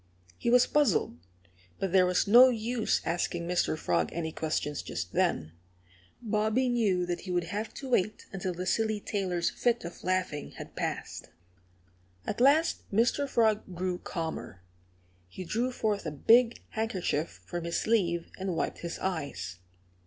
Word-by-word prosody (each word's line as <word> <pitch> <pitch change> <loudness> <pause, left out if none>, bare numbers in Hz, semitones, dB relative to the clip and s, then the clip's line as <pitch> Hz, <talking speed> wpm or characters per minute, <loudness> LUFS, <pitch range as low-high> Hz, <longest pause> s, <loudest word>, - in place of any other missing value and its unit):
He - - 0
was 245 +1 +6
puzzled; 250 - +1 0.6
but 195 - -2
there 185 -1 +5
was 180 0 +2
no 245 +5 +8
use 230 -1 0
asking 170 0 -1
Mr. 175 -3 +1
Frog 85 - 0
any 160 -1 -3
questions 150 -2 -2
just - - -5
then 80 - +1 0.7
Bobby 220 +3 +1
knew 205 -7 +2
that 175 0 -2
he 185 - -6
would 175 -1 +1
have 205 +6 -4
to 270 - -7
wait 210 -3 0
until 190 -1 -2
the 180 +1 -4
silly 220 +2 +1
tailor's 185 -5 -1
fit 240 -1 0
of 170 - -9
laughing 185 -5 -1
had - - -10
passed. - - -4 1.0
At 210 - -3
last 295 +5 +3
Mr. 235 +7 +2
Frog 215 -6 +1
grew 180 0 -2
calmer. 160 - -5 0.6
He 140 - -8
drew 235 +8 -1
forth 210 -7 -1
a - - -2
big 230 - +4
handkerchief 190 -8 -2
from 175 -1 -4
his 170 - -1
sleeve 175 -7 +1
and 190 -2 -2
wiped - - -2
his 170 0 -5
eyes. 145 - -4
190 Hz, 155 wpm, -29 LUFS, 170-225 Hz, 1.0 s, no